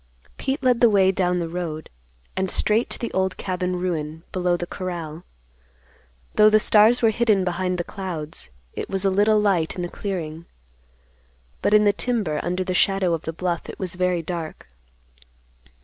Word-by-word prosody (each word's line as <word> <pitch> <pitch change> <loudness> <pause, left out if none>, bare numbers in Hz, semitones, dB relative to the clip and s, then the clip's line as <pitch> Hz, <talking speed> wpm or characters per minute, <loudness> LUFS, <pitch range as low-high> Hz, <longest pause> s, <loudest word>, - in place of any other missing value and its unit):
Pete 275 +1 -2
led 250 -2 +3
the 240 - +7
way 195 -2 +4
down 180 -1 +1
the 170 -1 -2
road, 165 -3 -5 0.5
and 190 0 -1
straight 215 +6 +2
to - - -5
the 235 - -4
old 190 0 0
cabin 180 -1 -2
ruin 160 -3 -3
below 180 -1 +1
the 175 - -4
corral. 175 -3 -6 1.1
Though 215 0 +6
the 215 0 +5
stars 220 +3 +5
were 225 - +5
hidden 215 -3 +2
behind 180 -1 -1
clouds, 170 - -5 0.2
it - - -5
was 195 0 -1
a 195 - +3
little 210 +2 +4
light 190 -6 +1
in 180 - -3
the - - -2
clearing; 170 -5 -5 1.1
but, 210 - +3
in 210 - +6
the 205 -1 +4
timber 205 -10 -1
under 180 +2 -1
the 185 - -2
shadow 190 -1 +2
of 165 - -3
the 160 - -2
bluff, 170 0 -3
it - - -8
was 185 -3 -2
very 180 -2 0
dark. 165 -1 -6
185 Hz, 175 wpm, -23 LUFS, 175-205 Hz, 1.1 s, the